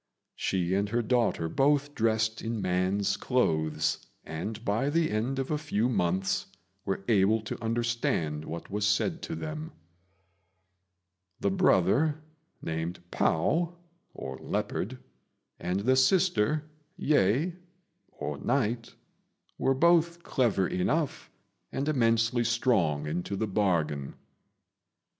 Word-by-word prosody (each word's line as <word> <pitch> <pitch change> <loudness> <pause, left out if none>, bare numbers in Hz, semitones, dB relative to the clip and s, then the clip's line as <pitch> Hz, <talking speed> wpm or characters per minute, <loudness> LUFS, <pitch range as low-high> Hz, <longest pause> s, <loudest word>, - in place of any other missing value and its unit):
She 90 -1 0
and 100 +1 +1
her 120 +2 0
daughter 115 -8 +1
both 145 - +2
dressed 110 -1 +1
in 115 0 -3
man's 95 +2 +1
clothes, 80 - +1 0.2
and 105 +8 -5
by 110 +7 +1
the 160 +1 +1
end 115 +5 -1
of 135 +1 -2
a 150 - 0
few 125 -7 0
months 95 -4 0 0.4
were 95 0 -2
able 110 0 +4
to 110 +1 -6
understand 115 -10 -1
what 85 +3 -7
was 105 +1 -1
said 135 - +1
to 165 - -4
them. 155 0 -6 1.7
The 100 - +1
brother, 120 - +3 0.4
named 80 +3 -3
Pao 165 - +1 0.4
[Leopard], 125 +7 -3 0.6
and 90 +3 -1
the 130 +5 +3
sister, 155 - +3 0.3
Yeh 150 - +2 0.9
[Night], 120 -2 0 0.6
were 135 - +2
both 170 +3 +3
clever 110 - +1
enough, 145 - -1 0.4
and 140 +2 -2
immensely 115 -3 +2
strong 115 - +1
into 90 +6 -3
the 110 - -1
bargain. 85 -9 0
115 Hz, 110 wpm, -29 LUFS, 95-135 Hz, 1.7 s, able